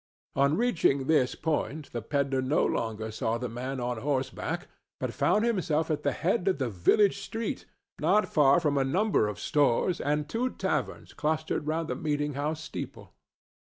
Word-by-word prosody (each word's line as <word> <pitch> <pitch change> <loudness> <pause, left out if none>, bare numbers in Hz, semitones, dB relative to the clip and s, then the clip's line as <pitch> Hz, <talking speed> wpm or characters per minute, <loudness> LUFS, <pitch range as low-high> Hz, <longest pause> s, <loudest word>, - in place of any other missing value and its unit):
On 140 +3 +3
reaching 165 - +2
this 135 -4 +2
point 155 -2 -2
the 120 - -3
pedler 135 +2 0
no 130 +4 +2
longer 110 -1 -2
saw 110 +1 -1
the 125 +1 -3
man 130 +3 -4
on 120 -1 -2
horseback, 135 0 -2 0.3
but - - -3
found 215 +2 +2
himself 165 -8 0
at 150 -1 -1
the - - +1
head 190 +2 0
of 190 - +3
the 130 -4 -2
village 185 - +3
street, 225 0 -4 0.3
not 210 - +3
far 145 -1 +5
from 145 -4 +1
a - - +3
number 180 - +2
of 105 -1 -5
stores 145 - +2
and 150 +1 0
two 240 +10 -1
taverns - - -3
clustered 155 -1 -1
round 160 +1 -1
the - - -1
meeting 145 -1 -1
house 150 +3 -2
steeple. - - -7
145 Hz, 170 wpm, -28 LUFS, 130-160 Hz, 0.3 s, far